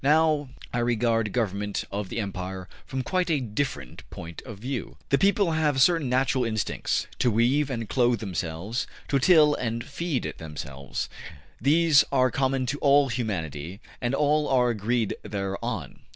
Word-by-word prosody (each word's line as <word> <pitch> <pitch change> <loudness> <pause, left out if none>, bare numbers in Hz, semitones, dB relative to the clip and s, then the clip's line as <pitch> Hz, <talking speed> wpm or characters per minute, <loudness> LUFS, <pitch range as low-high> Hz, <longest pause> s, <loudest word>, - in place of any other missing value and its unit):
Now 150 -1 +3 0.2
I 120 - 0
regard 115 -2 +1
government 105 -3 -1
of 100 -1 -3
the 115 - -3
empire 95 -2 -4 0.2
from 130 -1 -3
quite 180 +5 0
a 155 -3 +2
different 110 - -3
point 85 0 -8
of 110 -4 -7
view. 125 +3 -5
The 140 - +3
people 200 -2 +3
have 155 -4 +1
certain 165 -1 +4
natural 130 0 +2
instincts: 110 -2 -1
to 125 - +3
weave 125 +6 +2
and 115 -4 -3
clothe 120 0 +2
themselves, 95 +3 -3 0.2
to 140 - +3
till 150 0 +6
and 115 -3 -2
feed 145 +1 -3
themselves. 70 -3 -5 0.5
These 150 +2 +5
are 130 -2 +3
common 130 0 0
to 140 +4 -2
all 140 -1 +4
humanity, 90 - -3 0.2
and 120 +2 0
all 150 +1 +2
are 125 -2 +3
agreed 115 +1 0
thereon. 100 - -4
120 Hz, 150 wpm, -26 LUFS, 105-140 Hz, 0.5 s, till